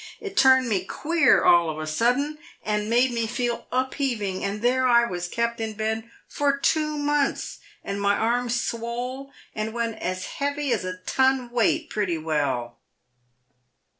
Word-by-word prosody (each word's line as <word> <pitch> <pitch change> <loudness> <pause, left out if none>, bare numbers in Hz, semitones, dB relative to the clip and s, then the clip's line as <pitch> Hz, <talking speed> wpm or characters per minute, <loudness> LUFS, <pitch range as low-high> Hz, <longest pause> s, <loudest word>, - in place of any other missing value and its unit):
It 410 -2 -7
turned 260 -3 +5
me 195 -5 0
queer 325 - +2
all 170 -2 +5
of 155 - -4
a 155 - -4
sudden, 250 - 0 0.3
and 210 0 -1
made 245 +2 +3
me 230 -1 -1
feel 240 +1 -2
upheaving, 250 -7 -1
and 200 +2 -3
there 255 +1 +3
I 235 -1 +5
was 180 -4 -4
kept 235 +4 -2
in 220 -1 -3
bed 220 +1 -3 0.2
for 280 -1 0
two 305 +1 +1
months, 290 -1 -1 0.2
and 200 0 -4
my 200 0 +3
arm 240 +2 0
swole, 240 +3 -3 0.2
and 215 +1 -3
went 230 -2 -2
as 185 0 -3
heavy 285 -1 -2
as - - -1
a 185 0 -4
ton 260 +5 +1
weight 315 +6 +1
pretty 190 -6 -1
well." 140 -7 -2
235 Hz, 160 wpm, -25 LUFS, 200-265 Hz, 0.3 s, turned